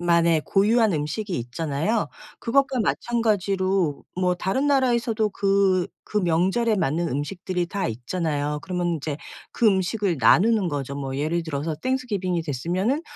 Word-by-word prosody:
만의 170 -2 +3
고유한 215 +2 +3
음식이 165 +6 -2
있잖아요. 150 - -1 0.3
그것과 270 +2 +1
마찬가지로 195 -8 0 0.2
뭐 180 -1 +2
다른 195 +10 -1
나라에서도 240 -6 +2
그 195 -2 +2 0.2
그 - - -4
명절에 190 +5 +2
맞는 170 -1 0
음식들이 175 +6 -2
다 195 +2 -2
있잖아요. 150 +4 -2
그러면 175 -2 -1
인제 150 -1 -4 0.3
그 235 - +2
음식을 190 -1 +1
나누는 195 - +4
거죠. 140 -2 -3
뭐 135 -1 -4
예를 160 +4 0
들어서 155 0 -3
땡스 255 - -2
기빙이 185 -6 -1
됐으면은 175 - -1
180 Hz, 335 characters per minute, -24 LUFS, 160-215 Hz, 0.3 s, 나누는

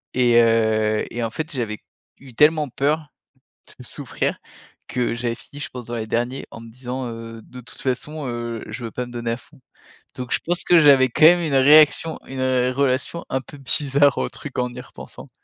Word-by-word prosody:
Et 120 -2 +4
heu 110 -1 +2
et 120 0 -3
en 115 - -1
fait 155 +6 -5
j'avais 115 -6 -3 0.4
eu 130 -3 -15
tellement 150 +3 +4
peur 150 +4 -1 0.7
de - - -10
souffrir 140 0 -3 0.5
que 125 -2 -1
j'avais 120 0 -2
fini, 145 - -14
je - - -5
pense, 125 -2 -9
dans 120 - -4
les 110 -1 -3
derniers 120 +4 -2
en 115 - -10
me 115 - -11
disant: 125 +1 -5
«Heu, 115 -1 -8
de 125 0 -12
toute 120 - -10
façon, 140 +3 -3
heu, 120 -1 -4
je 125 - -7
veux 115 - -6
pas 125 - -4
me - - -12
donner 120 -1 -3
à 115 - -2
fond», 140 +3 -20 0.6
donc 125 -1 -7
je - - +2
pense 175 +1 0
que 175 -1 +5
j'avais 135 -4 +6
quand 155 - 0
même 175 +1 +7
une 155 -4 -2
réaction 150 +3 +5
une 130 0 -5 0.3
relation 140 +5 0
un 130 0 -1
peu 145 - -13
bizarre, 140 +1 +2
au - - -1
truc, 145 -3 -9
en 125 0 -2
y - - -7
repensant. - - -12
125 Hz, 205 wpm, -22 LUFS, 120-145 Hz, 0.7 s, même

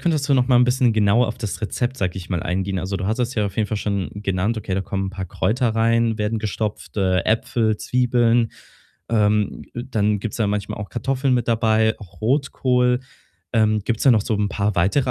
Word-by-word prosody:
könntest 155 -5 0
du 140 - +4
noch 125 -2 +3
mal 125 -1 +4
'n 125 - +6
bisschen 125 -1 +2
genauer 110 +3 +3
auf 115 +1 -4
das 110 -4 -4
Rezept, 120 +4 -2
sage 95 -6 -2
ich 95 0 -8
mal, 85 -3 -1
eingehen. 95 +2 -2
Also, 95 +2 -3
du 95 0 -3
hattest 120 +3 -1
ja 105 -2 +1
auf 100 - -7
jeden 110 - +1
Fall 110 - -2
schon 100 -3 -2
genannt: 100 +2 -1
Okay, 105 -3 -3
da 95 - 0
kommen 95 0 -3
'n - - -4
paar 95 -1 -5
Kräuter 115 +7 0
rein, 115 0 +2
werden 105 +1 -1
gestopft, 105 0 -4
äh, 95 -2 +2
Äpfel, 115 -1 +1
Zwiebeln. 120 -1 +2 0.6
Ähm, 105 -2 +1
dann 110 -4 0
gibt's 110 0 -4
da 110 - +1
manchmal 100 0 -3
auch 105 - -6
Kartoffeln 130 +1 0
mit 120 -1 -1
dabei, 110 -1 +2
auch 95 -5 -14
Rotkohl. 125 0 +1 0.5
Ähm, 110 -2 +3
gibt's 115 0 -1
da 135 - +7
noch 110 - +4
so 110 - -1
'n 105 0 0
paar 100 0 -1
weitere 115 +10 +2
110 Hz, 215 wpm, -21 LUFS, 100-120 Hz, 0.6 s, da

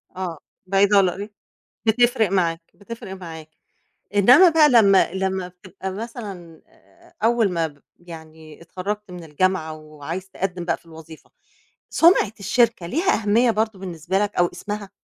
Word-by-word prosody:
آه، 180 -4 -5 0.3
بعيدة 200 +1 +3
ولّاقري 195 +2 +1 0.6
بتفرق 230 -1 +3
معاك، 170 -3 0
بتفرق 210 -1 -10
معاك. 165 -4 -10 0.7
إنمّا 250 - +7
بقى 310 -2 +5
لمّا 200 -7 +5
لمّا 190 -1 -2
بتبقى 185 +1 -9
مثلًا، 195 -6 -8
آآ، - - -25
أول 230 -3 +2
ما 165 -2 0
ب 145 -2 -18 0.2
يعني 160 -2 -13
اتخرجت 195 +3 -6
من 175 -1 -9
الجامعة 160 +1 -1
وعايز 155 +4 -8
تقدّم 185 -2 -4
بقى 165 -2 0
في - - -29
الوظيفة، 160 -1 -14 0.6
سُمعة 330 - +4
الشركة 200 -2 +1
ليها 340 - +1
أهمية 230 +4 +3
برضه 220 -2 -2
بالنسبة 180 0 -3
لَك 205 0 -2
أو 175 - +3
اسمها؟ 205 +2 -6
190 Hz, 140 wpm, -22 LUFS, 170-210 Hz, 0.7 s, إنمّا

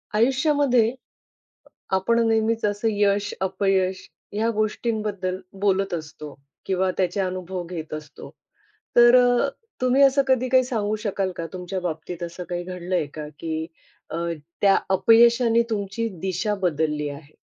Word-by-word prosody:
आयुष्यामध्ये 265 -1 +3
अ, - - -12 1.0
आपण 230 +5 +2
नेहमीच 225 0 +1
असं 205 +2 -1
यश, 205 0 +1
अपयश 190 0 0 0.2
या 220 +2 +1
गोष्टींबद्दल 210 -3 -2 0.2
बोलत 195 -2 +1
असतो 155 -2 -6 0.3
किंवा 190 0 +1
त्याचे 185 +1 0
अनुभव 185 -1 -3
घेत 160 -4 -6
असतो. 155 -1 -8 0.7
तर 240 +1 +8
अ, 245 +2 +3 0.3
तुम्ही 255 +2 +3
असं 275 +1 +5
कधी 255 -1 +2
काही 260 0 +5
सांगू 215 -4 -1
शकाल 195 -2 -1
का 165 - -3
तुमच्या 185 +1 -4
बाबतीत 175 0 -5
असं 170 +1 -6
काही 175 0 -3
घडलंय 180 -1 -2
का? 155 -1 -6
की 160 -1 -3 0.4
अ, - - -4 0.4
त्या 200 -1 +5 0.2
अपयशाने 230 +3 +5
तुमची 210 +2 -2
दिशा 190 +3 -1
बदलली 150 -4 0
आहे? 145 +1 -11
195 Hz, 135 wpm, -24 LUFS, 180-230 Hz, 1.0 s, तर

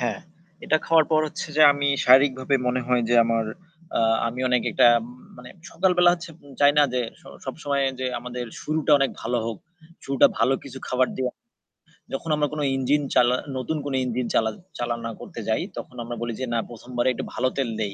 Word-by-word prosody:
হ্যাঁ। 120 -2 -1 0.5
এটা 155 - +3
খাওয়ার 165 -1 +5
পর 155 -1 +4
হচ্ছে - - -6
যে 155 - +6
আমি 140 0 -2 0.2
শারীরিকভাবে 130 +1 +4
মনে 125 +1 +1
হয় 125 -1 +2
যে 120 - +2
আমার 115 -1 0 0.5
আ - - +2 0.3
আমি 120 +2 -4
অনেক 125 -1 +2
একটা - - +4 0.5
মানে 125 0 -11 0.2
সকাল 185 +3 +1
বেলা 175 0 +7
হচ্ছে 170 -1 -9 0.3
চাই 145 0 +6
না - - +7
যে 125 - +1 0.2
স - - -25 0.2
সবসময় 140 0 -2 0.2
যে 130 - -1
আমাদের 125 0 -6 0.2
শুরুটা 155 0 -1
অনেক 135 -1 +1
ভালো 125 - -1
হোক। 115 -3 -4 0.5
শুরুটা 135 -1 +4
ভালো 125 +4 +3
কিছু 135 -1 -9
খাবার 130 0 +2
দিয়ে 130 -1 -1 0.8
যখন 165 +5 -4
আমরা 150 0 +1
কোনো 150 -1 -2
ইঞ্জিন 135 +3 +1
চালা 125 +1 +5 0.2
নতুন 130 +5 -2
কোনো 140 -2 -2
ইঞ্জিন 125 0 -2
চালান 110 -1 +1 0.2
চালনা 115 -1 -3
করতে - - -9
যাই - - +1 0.2
তখন 125 - -8
আমরা 120 +1 -6
বলি 120 0 -3
যে 130 - -2
না 115 - +1
১ম 120 +1 -12
বারে 120 +2 +3
একটু - - -5
ভালো 130 - 0
তেল 135 -3 0
দেই 105 -3 -2
130 Hz, 195 wpm, -24 LUFS, 120-145 Hz, 0.8 s, বেলা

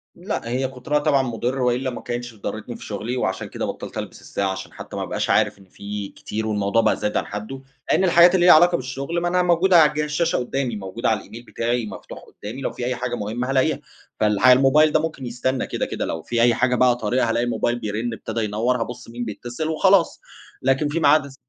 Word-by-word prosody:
لأ، 175 - -4
هي 130 +2 0
كُتْرها 135 +3 -1
طبعًا 145 -3 +2
مُضر 125 +2 -2
وإلا 125 +1 +1
ما 120 - -7
كانتش 120 -1 -5
ضرْتني 110 +3 -6
في - - -10
شغلي 110 +5 -4
وعشان 95 -5 -2
كده - - -4
بطّلت - - -6
ألبس - - -6
الساعة، 100 -1 -2
عشان 95 0 -7
حتى - - -9
ما - - -2
أبقاش - - -3
عارف - - +2
إن 95 - -17
في 100 +1 -6
كتير 110 +1 -5
والموضوع 105 +1 +1
بقى - - +2
زاد 105 - -2
عن - - -1
حده، 110 +6 -6 0.3
لأن 190 - +3
الحاجات 175 0 +6
اللي 175 -1 +3
ليها 175 - +9
علاقة 175 +2 +5
بالشغل 135 +4 -3
ما 175 - 0
أنا 180 +1 +2
موجودة 180 +1 +4
على 150 -1 +4
جهاز 150 0 -1
الشاشة 165 +3 +1
قدامي، 125 -1 -2
موجودة 100 +3 -3
على 110 - +1
الإيميل 115 +2 -11
بتاعي 120 0 -1
مفتوح - - -9
قدامي، 110 +6 -9
لو - - -2
في 120 - -5
أي 125 0 -1
حاجة 120 0 -3
مهمة 120 +4 -3
هالاقيها. 130 -1 +2 0.4
فالح 105 +2 +3
الموبايل 135 +4 +6
ده 155 - +3
ممكن 155 -4 -4
يسْتَنى 125 +2 -2
كده، - - -2
كده، - - -3
لو 80 - -4
في 120 +7 -1
أي 120 0 +5
حاجة 125 +2 +1
بقى 125 -1 +4
طارئة 120 +1 0
هالاقي 115 +1 +1
الموبايل 120 +1 -1
بيرن، 110 +3 -3
ابتدى 110 +1 -4
ينور، 115 +4 0
هابُص 120 0 -6
مين 120 +1 -5
بيتصل 120 +7 -5
وخلاص. 185 +2 +3 0.4
لكن 135 +3 +2
في 155 +3 -1
ميعاد 155 -2 +4
الس 135 -1 -12
125 Hz, 225 wpm, -22 LUFS, 115-140 Hz, 0.4 s, ليها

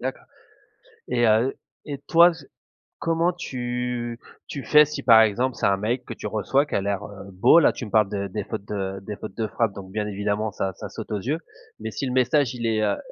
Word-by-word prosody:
D'accord. - - -4 0.9
Et 120 -1 +2
heu, 110 +5 +3 0.3
et 145 -2 -5
toi, 170 +1 +7 0.7
comment 165 +2 +1
tu 125 -5 -4 0.3
tu 140 - -6
fais 150 0 +7
si, 150 -1 -5
par 115 -4 +7
exemple, 120 +4 +1
c'est - - -2
un 100 -1 +3
mail 120 +5 -1
que 115 - -7
tu 105 - -6
reçois 110 +7 +1
qui - - -5
a 100 - +1
l'air, 100 0 -2
heu, 100 -1 -10
beau? 95 - +6
Là - - +5
tu 120 - -7
me - - -9
parles 105 -2 +4
de 100 -1 -3
des 105 +2 -4
fautes 105 -1 -6
de 95 -2 -4
des 105 +2 -6
fautes 105 -1 -9
de 110 - -1
frappe 110 -1 0
donc 95 -1 -10
bien 105 0 -1
évidemment 105 +1 -2
ça 95 -1 -3
ça - - -8
saute - - -8
aux 105 - -1
yeux, 145 - -1 0.4
mais 110 - -4
si 135 - -3
le 125 - -2
message 130 +1 +2
il 120 -2 -5
est, 110 -1 +1
heu, 100 -1 +1
110 Hz, 230 wpm, -24 LUFS, 100-130 Hz, 0.9 s, toi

